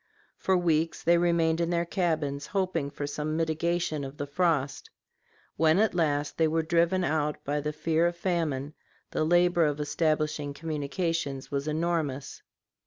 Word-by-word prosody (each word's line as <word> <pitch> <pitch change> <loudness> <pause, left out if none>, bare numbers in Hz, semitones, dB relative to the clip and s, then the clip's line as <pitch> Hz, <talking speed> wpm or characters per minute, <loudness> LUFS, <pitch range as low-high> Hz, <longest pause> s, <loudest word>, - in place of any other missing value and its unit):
For 190 -1 +2
weeks 165 -2 +1
they 170 0 +4
remained 170 -1 +2
in 170 - 0
their 170 0 +1
cabins 155 -6 -1
hoping 185 -7 -1
for 145 - -5
some 150 +2 -3
mitigation 165 -1 0
of 135 +2 -7
the 145 - -3
frost. 145 -2 0 0.7
When 160 +1 +4
at 220 0 +3
last 150 -4 0
they 160 - +4
were 160 +1 +1
driven 170 +3 +2
out 150 -2 0
by 145 +1 -1
the 150 +1 -2
fear 160 +2 +1
of 175 0 -3
famine, 155 -6 -1 0.4
the - - 0
labor 175 +1 +4
of 145 -1 -1
establishing 150 -1 0
communications 150 -2 -3
was 140 +1 -2
enormous. 155 -4 -2
160 Hz, 155 wpm, -28 LUFS, 145-170 Hz, 0.7 s, they